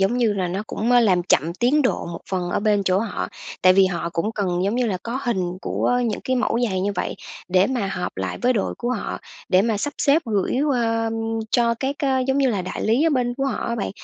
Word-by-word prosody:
giống 195 +6 +2
như 225 -4 +3
là 185 -3 -1
nó 190 +4 -3
cũng, 230 +3 -2
ơ, 245 - +6
làm 185 -6 +3
chậm 170 -2 +2
tiến 265 +8 +2
độ 255 - 0
một 170 0 -6
phần 180 -2 -1
ở - - 0
bên 210 -2 +2
chỗ 185 +1 +2
họ, 210 -3 -3 0.3
tại 185 0 +7
vì 190 0 +5
họ 170 -2 -2
cũng 210 +7 -1
cần 185 -3 -1
giống 205 +4 0
như 250 -1 +1
là 190 -4 -1
có 240 +3 -3
hình 185 -7 -1
của 245 0 0
những 215 - -2
cái 260 0 0
mẫu 230 0 +1
giày 190 -1 -1
như 200 +2 0
vậy - - -2 0.3
để 185 +1 +4
mà 245 -6 -1
họp 180 - -4
lại 95 0 -3
với 250 +1 +4
đội 205 -5 -1
của 240 +1 -2
họ, - - -3 0.3
để 185 +1 +4
mà 225 -2 +1
sắp 290 +7 -2
xếp 300 +3 +3
gửi 220 +4 0
qua 230 -5 +1 0.4
cho 235 -1 +3
các, 275 +1 -1
ơ, 265 -2 +1
giống 270 +1 +1
như 270 -2 +3
là 200 -5 -1
đại 185 - -5
lý 230 +7 +2
ở - - +3
bên 245 -3 0
của 270 +1 -2
họ 250 - -2
á 235 - -1
bạn. 215 - -3
220 Hz, 260 wpm, -22 LUFS, 185-245 Hz, 0.4 s, tại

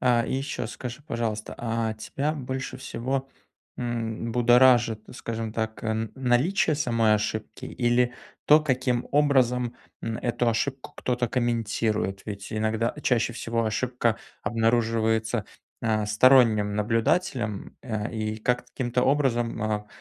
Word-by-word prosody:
Э, 120 -2 +3
и - - -2
ещё 135 -3 -3
скажи, 120 +2 -7
пожалуйста, 110 -2 -3
а 115 -1 -1
тебя 140 +7 -2
больше 130 -3 -4
всего, 130 +2 -3 0.5
м, 115 -1 -3
будоражит, 120 -1 +5
скажем 115 -2 -4
так, 110 0 -3
м, 110 -1 -1
наличие 135 +7 +2
самой 115 -6 +2
ошибки 110 +1 -3
или 120 0 +1 0.3
то, 150 +1 +7
каким 130 -4 0
образом, 125 -4 +3 0.3
м, 115 0 -2
эту 120 0 0
ошибку 130 +4 -2
кто-то 120 -1 -1
комментирует? 110 -5 -1
Ведь 100 -1 -6
иногда 110 +2 0
чаще 120 -2 +2
всего 115 0 -2
ошибка 115 +1 0 0.3
обнаруживается, 115 0 +1 0.4
а, 110 -2 0
сторонним 110 -2 +5
наблюдателем, 115 - 0
э, 110 -3 -3
и 110 -1 -2
как-то, 125 +3 0
каким-то 125 -1 0
образом, 120 -5 +1
а, 105 -1 -1
115 Hz, 125 wpm, -26 LUFS, 110-125 Hz, 0.5 s, то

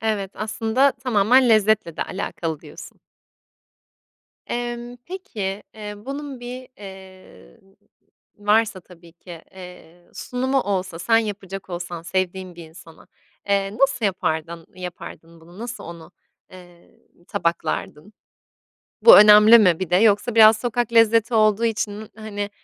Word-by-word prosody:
Evet, 210 -3 -2
aslında 225 +5 0
tamamen 250 0 +2
lezzetle 215 -6 +2
de - - -1
alakalı 165 -5 -5
diyorsun. - - -13 1.5
Emm, 240 0 -5
peki, 210 - -5
eee, 210 -1 -8
bunun 275 +3 -8
bir, 250 +1 -8
eee, 190 - -14 0.8
varsa 210 -1 +1
tabii 170 -2 -18
ki, 170 -1 -13
eee, 180 -2 -14
sunumu 260 +2 -2
olsa, 190 -5 -3
sen 225 +5 +2
yapacak 195 -3 -6
olsan 175 -1 -6
sevdiğin 185 0 -3
bir 165 -2 -12
insana, 165 0 -16 0.4
eee, 200 +1 0
nasıl 270 -4 +1
yapardın 165 -3 -3
yapardın 170 -2 -10
bunu? 175 +4 -17
Nasıl 240 +2 -7
onu, 170 -1 -11 0.4
eee, 175 -2 -17 0.3
tabaklardın? 170 -1 -3 0.9
Bu 475 - +10
önemli 210 +2 +8
mi 180 -6 +3
bir 185 -3 -5
de 180 - +4
yoksa 215 +3 +2
biraz 220 -1 +7
sokak 240 0 -2
lezzeti 230 +1 +3
olduğu 215 +1 +3
için, 215 -1 -3
hani, 205 -2 -6
205 Hz, 120 wpm, -21 LUFS, 180-225 Hz, 1.5 s, Bu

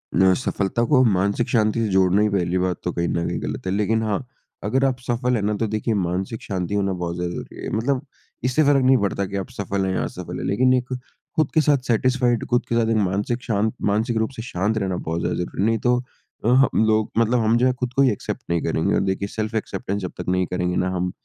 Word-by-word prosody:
न 95 0 +5
सफलता 105 0 -1
को 130 -3 +5
मानसिक 100 +1 +1
शांति 110 -1 +2
से - - +1
जोड़ना 95 +1 +4
ही 105 - +3
पहली 90 -3 0
बात 90 -1 0
तो 90 - -1
कहीं 85 0 -1
न 85 0 -1
कहीं - - -3
गलत - - -5
है। - - 0
लेकिन 110 +2 +1
हाँ, 110 +3 -1 0.4
अगर 130 +6 +1
आप 130 -2 0
सफ़ल 125 +1 +1
हैं 110 - 0
ना, 105 +1 +1
तो 110 - 0
देखिए 110 +2 -1
मानसिक 95 +2 -2
शांति 95 0 -3
होना 100 -1 +1
बहुत 90 -2 -3
ज़्यादा 90 0 -3
ज़रूरी - - -8
है। - - -3
मतलब 130 +5 0 0.4
इससे 130 +5 +2
फ़र्क़ 140 -2 +4
नहीं 130 0 +6
पड़ता 100 -2 -1
कि 100 +1 -4
आप 95 - -4
सफ़ल 100 -1 -2
हैं 95 - -1
या - - 0
असफ़ल - - -6
है। - - -4
लेकिन 130 +6 +3
एक 125 0 0 0.4
खुद 155 -4 +1
के 160 - +5
साथ 150 -1 +4
सैटिस्फाइड 120 0 +2
खुद 120 0 +2
के 120 - +1
साथ 115 -1 +2
एक 115 - +2
मानसिक 105 +5 0
शांत 110 -1 0 0.2
मानसिक 110 +3 0
रूप 110 0 +1
से 115 - -5
शांत 105 0 -1
रहना 95 -3 -1
बहुत 80 -1 -3
ज़्यादा - - -1
ज़रूरी 90 +1 -3
है। - - +3
नहीं 115 0 +2
तो, 125 0 +2 0.5
अ, - - +2
हम 130 -3 +4
लोग 110 0 +2
मतलब 115 +2 +3
हम 115 +1 +3
जो 125 - +3
हैं, 130 -1 +2
खुद 125 -1 -3
को 135 - +3
ही 135 -2 +5
एक्सेप्ट 105 - -4
नहीं 85 -1 +1
करेंगे 80 0 0
और - - +2
देखिए 95 +1 -1
सेल्फ 110 +2 -4
एक्सेप्टेंस 100 -1 -3
जब 90 - -4
तक - - -6
नहीं 90 0 +2
करेंगे 90 0 -1
ना 90 - +1
हम, 90 0 -1
105 Hz, 255 wpm, -22 LUFS, 95-120 Hz, 0.5 s, नहीं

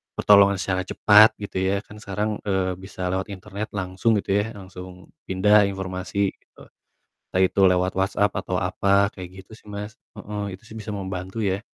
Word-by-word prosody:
pertolongan 100 -1 +5
secara 95 -1 -1
cepat 105 +1 +6
gitu 100 -2 -6
ya, 100 +2 0
kan 105 0 -13
sekarang, 105 +1 -3
eee, 95 -2 0
bisa 95 -1 -6
lewat 95 +2 -2
internet 100 +2 -6
langsung 95 +4 0
gitu 95 - -5
ya, 110 - -6
langsung 90 -2 -11 0.2
pindah 105 +2 +4
informasi 95 +1 -2
gitu. - - -23 0.7
Entah 95 - +2
itu 95 - 0
lewat 90 0 +1
WhatsApp 100 +1 +1
atau 95 -1 -3
apa, 100 +2 +2
kayak 90 -2 -8 0.2
gitu 110 - -20
sih - - -19
Mas. 105 +1 -7 0.2
Heeh, 100 -2 -5
itu 105 - -27
sih 110 - -14
bisa 105 0 -6
membantu 95 +2 -4
ya. 95 +1 0
100 Hz, 175 wpm, -23 LUFS, 95-105 Hz, 0.7 s, cepat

